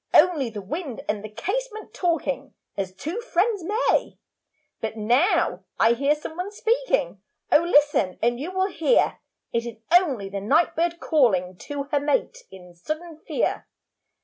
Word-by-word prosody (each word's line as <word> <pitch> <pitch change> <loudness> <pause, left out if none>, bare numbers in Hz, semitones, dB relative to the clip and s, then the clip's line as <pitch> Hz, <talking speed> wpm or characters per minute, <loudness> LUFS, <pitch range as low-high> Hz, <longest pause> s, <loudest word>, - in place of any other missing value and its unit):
Only 305 -7 +5
the 210 -3 -7
wind 285 - -5
and 210 -1 -2
the 215 - -6
casement 435 - -4
Talking 280 -6 -1 0.2
as 190 -2 -3
two 305 - -5
friends 415 -3 0
may. 425 +7 +1 0.6
'But 220 0 -4
now 245 - +2 0.2
I 225 +1 +5
hear 280 +5 +2
some 305 +1 -8
one 365 +4 -4
speaking, - - 0 0.3
Oh 300 - +7
listen 290 - +3
and 240 +1 +1
you 300 +6 -4
will 375 0 0
hear.' 370 +7 +2 0.3
It 235 - +1
is 230 - -7
only 295 - +3
the 195 0 -5
night 320 - +2
bird 340 +1 0
calling 190 - +2
To 285 +9 -5
her 290 - +3
mate 295 - 0
in 180 -2 -13
sudden 310 - -6
fear. - - -1
295 Hz, 155 wpm, -24 LUFS, 225-360 Hz, 0.6 s, Oh